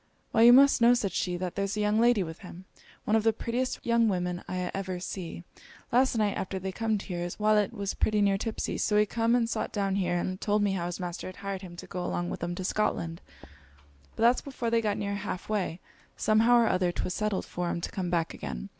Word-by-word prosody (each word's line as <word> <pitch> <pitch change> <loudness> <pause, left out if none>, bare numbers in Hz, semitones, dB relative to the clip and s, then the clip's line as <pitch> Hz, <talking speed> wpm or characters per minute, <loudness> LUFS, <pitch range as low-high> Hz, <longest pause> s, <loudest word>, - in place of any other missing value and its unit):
'Why 225 - +3
you 235 +1 +9
must 275 0 +6
know,' 240 +1 +7
said 210 -6 -1
she, 180 -1 -1
'that 180 -1 -4
there's 200 +1 -2
a - - -1
young 210 +1 +2
lady 235 -4 +4
with 160 -1 -8
him; 180 -1 -11 0.4
one 215 - +2
of 220 - +4
the 225 +1 +3
prettiest 240 +3 -3
young 235 -1 +3
women 180 -3 -1
I 180 -1 -3
ever 190 -2 -3
see. 175 -2 -6 0.5
Last 250 0 +3
night, 210 -2 +1
after 190 0 -3
they 190 0 -4
comed 220 0 -1
here, 180 -3 -5
his 175 0 -4
walet 210 -1 +3
was 200 -1 -3
pretty 215 -1 +1
near 200 -1 +3
tipsey; 225 +1 -3
so 210 - +2
he 210 - +5
come 230 +2 +1
and 235 -2 +2
sot - - -2
down 195 -2 -1
here, 175 -2 0
and 185 +1 -3
told 210 0 +1
me 200 - +2
how 175 -3 -2
his 175 - -5
master 175 -1 -5
had 185 - -8
hired 195 -1 -5
him 180 -3 -10
to - - -9
go 180 0 -5
along 175 0 -2
with - - -5
'em 175 0 -2
to 185 - -5
Scotland; 170 -4 -1 0.9
but - - -2
that 240 +2 +4
before 245 -4 -3
they 230 0 +3
got 210 -2 -1
near 200 -1 -2
half 200 -2 -5
way, 190 -5 -2 0.4
somehow 225 +3 +4
or 235 -1 +4
other 180 -3 +1
'twas 180 - -3
settled 210 -2 -1
for 175 0 -4
'em 170 - -2
to - - -5
come 185 -2 -3
back 170 -2 0
again. - - -6
200 Hz, 245 wpm, -28 LUFS, 180-220 Hz, 0.9 s, you